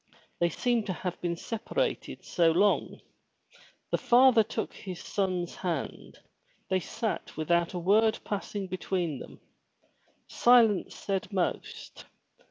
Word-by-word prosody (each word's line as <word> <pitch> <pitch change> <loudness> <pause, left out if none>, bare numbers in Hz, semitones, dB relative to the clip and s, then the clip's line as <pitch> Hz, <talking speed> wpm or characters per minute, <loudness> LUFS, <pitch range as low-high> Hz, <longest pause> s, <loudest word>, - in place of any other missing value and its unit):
They 170 - +3
seemed 235 +5 0
to 190 - -1
have 180 0 -5
been 175 -1 -1
separated 230 - -3
so 170 -2 +3
long. 200 +5 +1 0.9
The - - +1
father 245 -1 +6
took 220 +1 -3
his 185 -3 -8
son's 185 -4 -2
hand; 170 -6 -4 0.5
they 190 - +3
sat 215 +1 -4
without 170 +3 +1
a - - -1
word 215 +5 +3
passing 205 -1 -4
between 180 -5 -2
them. - - -11 0.9
Silence 235 -5 +4
said 195 0 -3
most. 185 -3 -3
190 Hz, 120 wpm, -29 LUFS, 175-220 Hz, 0.9 s, father